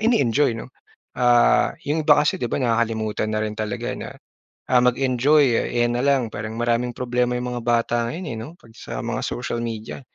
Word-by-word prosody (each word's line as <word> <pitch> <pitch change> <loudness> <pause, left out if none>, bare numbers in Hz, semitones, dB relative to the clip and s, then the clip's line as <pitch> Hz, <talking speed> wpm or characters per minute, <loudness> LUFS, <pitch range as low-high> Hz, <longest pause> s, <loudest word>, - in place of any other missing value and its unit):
ini-enjoy 145 - +2
'no. - - -8 0.5
Ah, 120 - +4
'yong 155 +2 0
iba 145 -1 +6
kasi 150 - +1
'di - - -1
ba, - - -1
nakakalimutan 115 -3 0
na 110 - 0
rin 105 -1 -4
talaga 105 -2 -3
na, - - -7 0.6
ah, 125 -1 +5
mag-enjoy, 130 +4 +3 0.3
ayan 120 0 +2
na 120 - 0
lang. 135 -4 +2
Parang 110 +2 -5
maraming 120 +1 0
problema 125 0 0
yung 125 0 -3
mga 120 - -4
bata 120 0 +1
ngayon 175 +8 -6
eh, 110 - -6
'no? 110 - -6
'Pag 115 -8 -20
sa - - -7
mga - - -2
social 120 -1 -3
media, 115 +1 -5
120 Hz, 190 wpm, -22 LUFS, 115-130 Hz, 0.6 s, iba